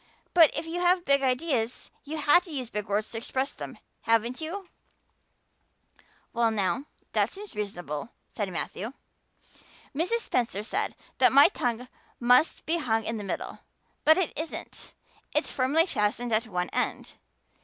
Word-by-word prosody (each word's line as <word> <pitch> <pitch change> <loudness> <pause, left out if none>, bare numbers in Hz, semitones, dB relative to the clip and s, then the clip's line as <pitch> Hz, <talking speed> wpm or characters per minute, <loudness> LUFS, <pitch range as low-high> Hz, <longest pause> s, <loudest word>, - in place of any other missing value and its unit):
But 330 -4 +8
if 310 - -1
you 335 +2 -3
have 355 0 +3
big 280 0 +4
ideas 255 -3 -1
you 310 +2 -5
have 310 +4 +5
to - - -12
use 255 -5 -4
big 210 -1 -3
words 205 +1 -1
to 225 - -3
express 260 +4 -2
them, - - -8 0.2
haven't 230 +4 +1
you?" 370 +5 -5 1.7
"Well 235 -1 +3
now, 220 +6 -1 0.3
that - - +1
seems 410 +1 -9
reasonable," 175 -5 -4 0.2
said 205 -4 -3
Matthew. 205 +6 -4 1.0
"Mrs. 365 +11 0
Spencer 225 - -1
said 395 - -2 0.2
that - - +6
my 280 +1 +8
tongue 245 0 -2 0.3
must 250 +6 +4
be 335 +2 +1
hung 225 -6 0
in 225 - -2
the 210 - -5
middle. 195 - -5 0.4
But 315 +1 +6
it 375 -3 0
isn't 320 +1 -6 0.4
it's - - +2
firmly 280 +6 +3
fastened 230 - -1
at 220 +2 +2
one 180 -3 -2
end. - - -1
250 Hz, 155 wpm, -28 LUFS, 220-320 Hz, 1.7 s, But